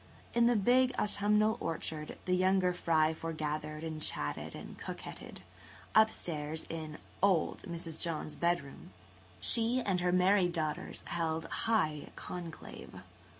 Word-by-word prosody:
In 235 0 +5
the 240 - +4
big 250 +5 +4
autumnal 210 +2 +2
orchard 155 -1 -3
the 180 - +2
younger 185 0 +3
fry 160 -2 +2
foregathered 155 -1 -4
and 155 -1 -4
chatted 75 - -1
and - - -8
coquetted. - - -7 0.5
Up 220 0 +7
stairs, 155 -3 -4
in 155 -2 -5 0.2
"old" 190 -4 +2
Mrs. 165 -2 -5
John's 155 -2 -3
bedroom, 170 - -2 0.5
she 235 +2 +5
and 195 -7 0
her 180 0 +1
married 180 0 +4
daughters 155 -3 -3
held 165 -1 -1
high 160 -10 0
conclave. 170 -3 -8
170 Hz, 125 wpm, -33 LUFS, 155-200 Hz, 0.5 s, Up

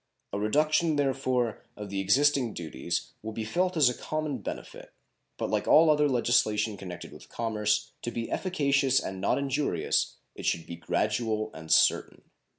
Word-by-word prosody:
A 100 - -1
reduction, 155 +8 +2
therefore, 130 -5 0 0.2
of 105 -2 -7
the 100 - -2
existing 130 +4 +2
duties 80 -6 -4
will 110 0 -6
be 110 0 -4
felt 180 +9 0
as 145 -5 +6
a 125 - +2
common 155 -1 -3
benefit, 100 - -8 0.4
but - - -3
like - - 0
all 155 0 +7
other 150 -1 +3
legislation 110 -4 +2
connected 90 -3 -8
with - - -14
commerce, 105 -2 -1
to - - -3
be 115 -1 -5
efficacious 140 -7 +2
and 95 0 -6
not 100 - +2
injurious 140 - 0 0.2
it - - -6
should 85 - 0
be 85 - -7
gradual 110 +5 -1
and 80 0 -8
certain. - - +3
120 Hz, 160 wpm, -28 LUFS, 105-145 Hz, 0.4 s, all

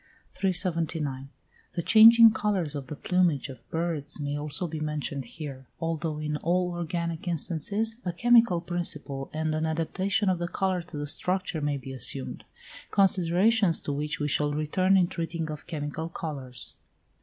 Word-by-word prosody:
379. 165 -7 0 0.4
The 170 - -3
changing 225 +2 +8
colours 200 -8 -1
of 140 -2 -5
the 150 - -6
plumage 170 -4 +1
of 120 -3 -12
birds 160 -3 -2
may 145 0 -2
also 145 +4 -2
be 160 -1 -5
mentioned 150 -3 -3
here, 135 -1 -8
although 165 -2 -2
in 150 0 -2
all 180 +3 0
organic 170 -1 -3
instances 180 +7 0
a 180 - -2
chemical 230 -1 +4
principle 150 -6 -3
and 155 0 -2
an 155 +1 -1
adaptation 185 +6 0
of 185 -2 +2
the 175 - -2
colour 185 0 -1
to 170 -2 -10
the 145 - -3
structure 180 +2 -2
may 145 -1 0
be 135 0 -8
assumed; 130 +1 -1 0.4
considerations 190 +1 +3
to 145 - -3
which 150 +4 -3
we 145 - 0
shall 145 0 +1
return 185 +6 +2
in 180 - +4
treating 165 -2 -4
of 150 - -8
chemical 155 0 -4
colours. 135 -7 -6
165 Hz, 155 wpm, -27 LUFS, 145-180 Hz, 0.4 s, changing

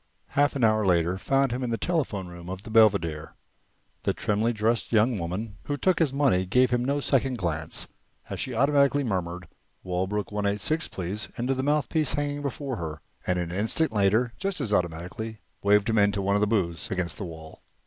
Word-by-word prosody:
Half 145 0 +2
an 135 - -1
hour 110 -1 +4
later 85 -2 +2
found 135 +4 +2
him 125 +2 -2
in 125 - -1
the 115 - 0
telephone 135 - -1
room 85 0 -10
of 95 +1 -6
the 110 - -9
Belvedere. 95 -9 +3 0.7
The - - 0
trimly 110 +3 +1
dressed 110 0 0
young 115 0 +3
woman 95 +5 -4
who 145 - -2
took 185 +2 +2
his 160 -5 +3
money 135 -10 +2
gave 125 +6 +3
him 120 0 +1
no 140 +3 0
second 135 -2 +1
glance 80 -5 -2 0.4
as - - -5
she 130 - -3
automatically 140 +2 +3
murmured 90 -6 -3 0.4
"Walbrook 95 +4 -2
1 105 0 -2
8 100 +1 0
6, 160 +7 0
please," 95 +3 -4
into 125 +3 0
the 130 - -2
mouthpiece 150 +2 +1
hanging 145 0 -2
before 140 -2 -3
her, 80 -3 -5 0.3
and 90 - +1
an 85 -1 -2
instant 110 - +2
later, 110 +4 +2
just 195 -2 -2
as 115 -7 -1
automatically, 90 +5 -2 0.2
waved 100 0 +4
him 110 -1 +2
into 100 -1 +2
one 100 +1 +1
of 100 - +2
the 105 - +3
booths 90 -6 -1
against 90 0 -2
the - - -3
wall. 80 -2 -10
110 Hz, 200 wpm, -26 LUFS, 90-135 Hz, 0.7 s, hour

